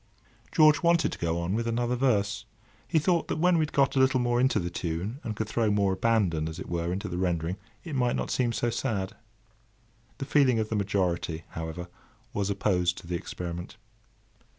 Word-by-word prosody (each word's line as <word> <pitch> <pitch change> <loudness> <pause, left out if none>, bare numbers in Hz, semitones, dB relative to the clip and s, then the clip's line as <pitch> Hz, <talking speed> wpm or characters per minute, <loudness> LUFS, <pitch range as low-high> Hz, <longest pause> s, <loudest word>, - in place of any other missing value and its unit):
George 155 -3 +5
wanted 170 -1 +3
to - - -7
go 85 0 0
on 85 +2 -1
with 115 +2 -1
another 120 +1 0
verse. 105 -5 +1 0.4
He 165 - +1
thought 170 +2 +2
that - - -2
when 180 +3 +4
he 170 - +3
had 155 -2 0
got 140 0 +2
a - - +3
little 130 0 +4
more 120 0 +2
into 130 +1 +3
the 85 0 -2
tune, 90 +9 -3
and 110 - -4
could 110 0 -2
throw 110 0 +1
more 100 -2 +2
"abandon," 95 -8 +1
as 80 - -7
it - - -7
were, 85 0 -2
into 95 +2 -3
the 90 0 -3
rendering, 90 0 -1 0.3
it 165 - -6
might 125 -3 +1
not - - -2
seem 125 -2 +1
so 120 +1 0
sad. 110 -6 -2 1.0
The 135 - -4
feeling 135 -4 +4
of 110 -1 -1
the 110 - -1
majority, 90 -5 -1
however, 80 +2 -5 0.5
was 100 -1 -1
opposed 90 -3 +1
to - - -10
the 90 +1 -3
experiment. 85 0 -6
105 Hz, 200 wpm, -28 LUFS, 90-125 Hz, 1.0 s, George